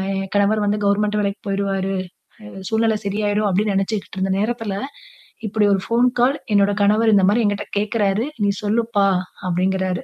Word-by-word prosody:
என் 195 0 -4
கணவர் 205 +1 +2
வந்து 205 +1 +1
கவர்ன்மென்ட் 210 +1 +1
வேலைக்கு 200 0 -3
போயுருவாறு 195 -1 -1 0.5
அ - - -11 0.2
சூழ்நில 220 -1 +1
சரியாயிரும். 205 +1 0
அப்படின்னு 200 +2 +1
நெனைச்சிக்ட்டு 195 0 -2
இருந்த 190 0 0
நேரத்தில, 225 -1 -2 0.7
இப்படி 210 0 +1
ஒரு 195 - 0
ஃபோன் 235 +2 +3
கால் 265 +4 +3 0.2
என்னோட 200 0 +3
கணவர் 215 +2 +3
இந்த 195 -2 +4
மாரி 230 +3 +2
என்கிட்ட 205 0 -1
கேக்கிறாரு 210 +1 0 0.2
"நீ 200 - +3
சொல்லுப்பா" 215 -1 +1 0.4
அப்படிங்கிறார் 185 +1 0
205 Hz, 155 wpm, -20 LUFS, 195-215 Hz, 0.7 s, இந்த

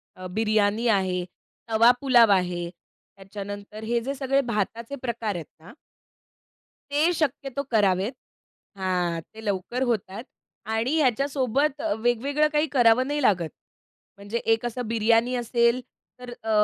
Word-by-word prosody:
अ, 185 0 -8
बिर्याणी 215 +2 +1
आहे, 190 -4 +1 0.5
तवा 225 +2 +6
पुलाव 240 -5 +5
आहे. 175 -2 -2 0.5
त्याच्यानंतर 205 +2 -8
हे 235 +2 0
जे 270 +4 -3
सगळे 270 0 +1
भाताचे 230 +2 -3
प्रकार 230 -4 -2
आहेत 170 -3 -5
ना 165 +4 -14 1.2
ते 305 +4 +3
शक्यतो 280 -3 -2
करावेत 200 0 +2 0.6
हां. 180 -3 -1
ते 220 - -10
लवकर 205 +5 -2
होतात. 220 -3 -2 0.4
आणि 225 +6 0
ह्याच्यासोबत 275 +1 +1
अ, 325 - 0
वेगवेगळं 265 +6 +1
काही 300 +1 +2
करावं 245 +1 +5
नाही 290 +1 -1
लागत. 180 - +2 0.7
म्हणजे 200 +3 -4 0.2
एक 225 +2 -2
असं 240 0 -3
बिर्याणी 230 +2 +2
असेल, 235 0 +2 0.4
तर 250 -1 -9
अ, 225 - -4
230 Hz, 130 wpm, -25 LUFS, 205-255 Hz, 1.2 s, तवा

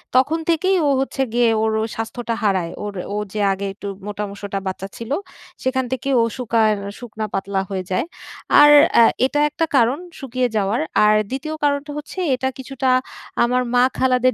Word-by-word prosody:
তখন 285 +6 +3
থেকেই 370 +4 +2
ও - - +3
হচ্ছে 270 0 -2
গিয়ে 240 -1 +4
ওর 220 0 +1
ও - - 0
স্বাস্থ্যটা 230 +1 -3
হারায়। 190 -5 +1
ওর 205 -1 -4 0.2
ও - - -1 0.2
যে 215 - -3
আগে 195 +1 -5
একটু 200 +1 -8 0.2
মোটা-সোটা 200 -1 -4
বাচ্চা 190 +1 -4
ছিল। 230 +2 -7 0.5
সেখান 260 0 0
থেকে 260 +1 -2
ও - - +4
শুকার 225 -3 +2 0.3
শুকনা-পাতলা 205 -4 -3
হয়ে 190 -2 -3
যায়। 185 - +1 0.6
আর 295 0 +8 0.2
অ্যা 235 - +8 0.2
এটা 290 +3 0
একটা 325 +2 -1
কারণ 245 +1 +4 0.2
শুকিয়ে 255 -2 -1
যাওয়ার। 210 +6 0 0.2
আর 210 0 +5
২য় 290 +4 -4
কারণটা 290 0 0
হচ্ছে 300 +5 -7 0.2
এটা 260 +1 -2
কিছুটা 265 0 -2 0.5
আমার 250 +1 +2
মা-খালাদের 255 0 +3
245 Hz, 165 wpm, -20 LUFS, 210-265 Hz, 0.6 s, আর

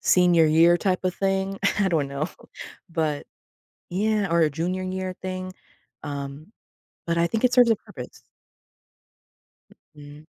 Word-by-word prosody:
senior 175 -3 +5
year 165 +3 +5
type 185 0 0
of 180 - 0
thing. 195 0 -1 0.2
I 195 - +3
don't 155 -6 0
know. 140 +4 -3 0.6
But 155 -3 -2 0.6
yeah, 210 +1 0
or 170 - +3
a 155 - +4
junior 175 +5 -2
year 185 0 -4
thing. 185 0 -5 0.5
Um, 140 +1 -6 0.6
but 170 0 0
I 170 - +3
think 225 +7 -2
it 250 - +4
serves 245 -2 +6
a 225 - +4
purpose. - - -11 1.7
Mhm. 145 +1 -13
175 Hz, 140 wpm, -24 LUFS, 155-190 Hz, 1.7 s, serves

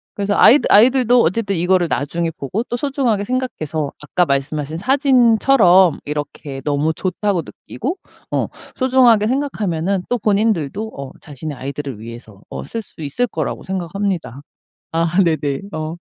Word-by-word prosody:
그래서 200 0 -1
아이들 280 +5 +6
아이들도 245 +2 +5
어쨌든 200 +3 0
이거를 180 0 +2
나중에 165 +3 -1
보고 165 - -4
또 240 - -4
소중하게 250 -7 0
생각해서 160 - -3
아까 175 +4 +1
말씀하신 145 +2 -2
사진처럼 235 - +4
이렇게 145 -2 -5
'너무 150 +2 0
좋다.'고 190 +2 -1
느끼고 365 - -6 0.3
어 - - 0 0.3
소중하게 250 -5 +4
생각하면은 200 - -1
또 245 - +1
본인들도 210 -2 0
어 140 -1 -7
자신의 145 0 -7
아이들을 135 -2 -6
위해서 110 -3 -11
어 - - -6
쓸 230 - -5
수 175 - -16
있을 150 - -1
거라고 - - -4
생각합니다. 185 - -3 0.5
아 165 +1 0
네네. 150 -5 -1
어. 155 0 -4
180 Hz, 350 characters per minute, -19 LUFS, 150-225 Hz, 0.5 s, 아이들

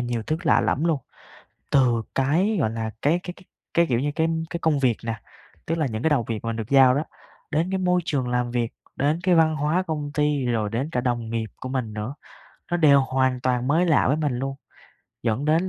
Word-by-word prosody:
nhiều 120 -2 -2
thứ 155 +7 -1
lạ - - +4
lẫm 150 - 0
luôn. 160 -5 +1 0.7
Từ 120 -4 +3
cái, 170 +11 +2
gọi 110 - +1
là, 110 -1 -3
cái 160 +5 +3
cái 180 - -6
cái 185 - -17 0.3
cái, 170 0 +4
kiểu 120 -4 +1
như, 145 +2 0
cái 160 0 +1 0.2
cái 170 - -3
công 155 -3 +2
việc 125 -5 +2
nè, 115 -2 -3 0.5
tức 165 +1 -1
là 155 - +1
những 110 -2 -4
cái 160 - +2
đầu 135 -6 +2
việc 115 -1 -4
mà - - -2
mình 115 - -2
được 110 -2 -5
giao 130 -2 +6
đó, 145 - 0 0.5
đến 165 +4 0
cái 190 - 0
môi 180 -1 +2
trường 135 -6 -1
làm 125 0 0
việc, 120 -1 -1 0.2
đến 150 +4 +1
cái 185 -1 +3
văn 160 -2 +4
hóa 155 +5 +1
công 150 -5 -4
ty, 150 -2 +1
rồi 110 -4 0
đến 130 +8 -2
cả 125 - 0
đồng 120 -3 -2
nghiệp 115 -1 -3
của 130 - -7
mình 130 -5 -3
nữa, 105 +6 -4 0.6
nó 175 - +2
đều 145 -4 +6
hoàn 130 -1 0
toàn 125 0 0
mới 165 +5 +3
lạ 160 -4 +3
với 145 +4 +2
mình 145 -6 -1
luôn. 135 +1 -3 0.7
Dẫn 115 +4 0
đến 165 +4 +2
135 Hz, 235 wpm, -24 LUFS, 120-160 Hz, 0.7 s, giao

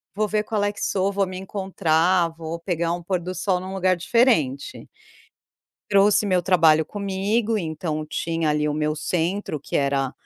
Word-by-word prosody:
"Vou 215 0 0
ver 210 0 0
qual 210 -1 -1
é 205 - +1
que - - -10
sou, 195 0 0
vou 195 -1 +1
me 185 0 -6
encontrar, 185 -3 +1
vou 165 0 -7
pegar 170 -1 -1
um 175 0 -3
pôr 185 0 -1
do 180 +2 -5
sol 185 -3 0
em - - -8
um 190 - -6
lugar 185 -1 +2
diferente". 175 - +1 1.0
Trouxe 200 +1 +4
meu 185 -2 +2
trabalho 160 -3 +4
comigo, 205 +4 -1
então 160 -2 -3
tinha 165 0 -1
ali 150 0 +1
o 150 - -1
meu 150 0 -1
centro 170 +1 -2
que - - -6
era 140 -1 0
180 Hz, 180 wpm, -23 LUFS, 160-200 Hz, 1.0 s, Trouxe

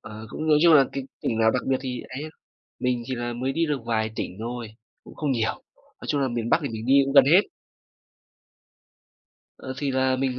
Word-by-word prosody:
ờ, 110 +1 -9
cũng 155 +8 -5
nói 150 -1 +5
chung 170 -2 +7
là 140 -3 +7
cái 135 -1 -4 0.2
tỉnh 115 - -1
nào 110 0 +4
đặc - - -1
biệt 135 - +3
thì 125 -2 -4
ấy 130 +3 -6
hơn, 155 - -7 0.5
mình 125 -1 0
chỉ 130 +1 -3
là 120 0 -3
mới 130 +3 -2
đi 165 +2 +1
được 150 -3 -1
vài 110 -1 0
tỉnh 90 - -5
thôi, 120 0 -5 0.4
cũng - - -14
không 150 -3 -1
nhiều. 115 -3 0 0.2
Nói - - -15
chung 145 -1 0
là 135 - +1
miền 120 -2 -3
Bắc - - +4
thì 140 - -2
mình 110 0 -6
đi 130 - +3
cũng 135 - -3
gần 140 -2 +8
hết. 170 +8 +6 2.2
Ờ, 130 - -6
thì 140 0 -1
là 130 0 +1
mình 130 -1 -1
130 Hz, 230 wpm, -25 LUFS, 115-140 Hz, 2.2 s, gần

